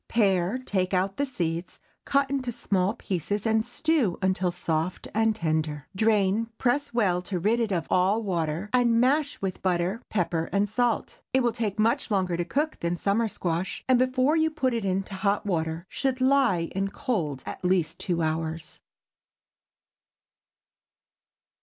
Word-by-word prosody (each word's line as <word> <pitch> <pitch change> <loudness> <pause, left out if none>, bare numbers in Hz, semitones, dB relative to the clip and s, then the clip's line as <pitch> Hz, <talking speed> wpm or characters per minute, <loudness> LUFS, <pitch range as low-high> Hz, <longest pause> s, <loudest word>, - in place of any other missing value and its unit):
Pare, 195 -1 +2
take 190 -7 -1
out 190 +2 0
the 285 - 0
seeds, 170 -7 -3 0.3
cut 280 0 +2
into 265 -2 -2
small 200 -3 0
pieces, 200 0 -3
and 220 0 +3
stew 250 - 0
until 185 -1 +1
soft 165 0 -2
and 225 0 +2
tender. 155 -5 -1
Drain, 215 +1 +2
press 265 +4 0
well, 195 -7 +1
to 180 +1 -3
rid 215 +7 +1
it 225 -3 0
of 175 -3 0
all 185 +3 +3
the 225 - -1
water, 175 -1 -2
and 240 -2 +4
mash 285 +4 +2
with 190 -1 -3
butter, 185 +4 0
pepper, 170 -4 -1
and 200 +1 +2
salt. 235 +2 -1
It 260 -1 +3
will 240 - +2
take 220 -4 -2
much 220 +2 +1
longer 185 -4 +1
to 175 - -1
cook 295 - -1
than 170 +1 -1
the - - -11
summer 215 +3 +1
squash, 175 -3 -3
and 255 -1 +4
before 255 +3 +2
you 320 0 +3
put 275 -5 0
it 230 -2 -1
into 195 +1 -1
hot 200 +2 0
water, 165 -2 -2
should 265 -2 -1
lie 255 -11 +3
in 195 +1 0
cold 170 - -2
at - - -7
least 180 -3 +1
two 170 -2 -1
hours. 160 0 -3
200 Hz, 165 wpm, -26 LUFS, 175-240 Hz, 0.3 s, and